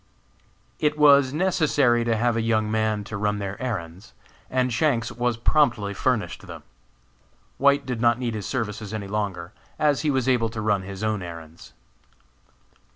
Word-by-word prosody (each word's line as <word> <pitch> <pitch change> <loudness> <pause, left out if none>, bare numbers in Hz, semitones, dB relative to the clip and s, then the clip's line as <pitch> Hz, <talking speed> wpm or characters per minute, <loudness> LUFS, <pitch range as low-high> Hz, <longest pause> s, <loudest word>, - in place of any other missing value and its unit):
It 150 0 +1
was 140 -3 +6
necessary 150 -8 +2
to 115 -1 +1
have 120 +1 +1
a 115 - 0
young 110 -1 0
man 110 -1 0
to 110 +2 -7
run 105 0 0
their 100 +1 -5
errands, 95 -5 -5 0.3
and 130 -1 0
Shanks 125 -2 +1
was 120 0 -1
promptly 115 -6 +2
furnished 120 +2 -2
them. - - -9 1.0
White 140 +1 +3
did 125 -3 -4
not 120 -1 +4
need 120 -2 -3
his 105 -3 -5
services 110 -4 -4
any 100 -2 -5
longer, 95 -4 -3 0.2
as 150 -2 +2
he 155 - 0
was 130 -3 0
able 120 -3 +2
to 110 0 -7
run 105 -2 +1
his 95 +2 -7
own 110 -2 -1
errands. 85 -2 -10
115 Hz, 160 wpm, -24 LUFS, 105-130 Hz, 1.0 s, was